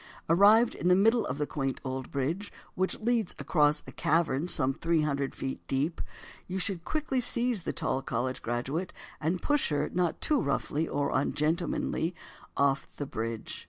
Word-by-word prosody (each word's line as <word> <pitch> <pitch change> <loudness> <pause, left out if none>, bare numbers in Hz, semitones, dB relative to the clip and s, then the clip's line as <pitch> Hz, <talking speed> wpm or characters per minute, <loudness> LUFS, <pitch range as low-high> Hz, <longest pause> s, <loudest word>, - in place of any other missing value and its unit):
Arrived 205 +7 +6
in - - -2
the 180 - +6
middle 225 +5 +3
of 130 - -3
the 150 - 0
quaint 135 -3 -3
old 130 -1 -4
bridge, 160 +9 -2 0.2
which 185 +1 -1
leads 230 -3 0
across 150 -2 +2
a - - -9
cavern 160 -1 +1
some 135 -6 +2
three 165 +2 +1
hundred 140 -2 -1
feet 135 - -4
deep, 145 +5 -1 0.5
you 185 - -3
should 185 -2 -2
quickly 300 - -1
seize 240 -2 +2
the - - -3
tall 130 - -1
college 130 0 -2
graduate, 130 +9 -2 0.3
and 170 +4 -1
push 290 -1 +2
her, 145 -1 0
not 175 -2 0
too 295 -4 +2
roughly 145 +3 -1
or 145 0 -1
ungentlemanly, 160 +3 0 0.4
off 140 0 +2
the 145 - -3
bridge. 115 -3 -4
160 Hz, 165 wpm, -29 LUFS, 135-190 Hz, 0.5 s, Arrived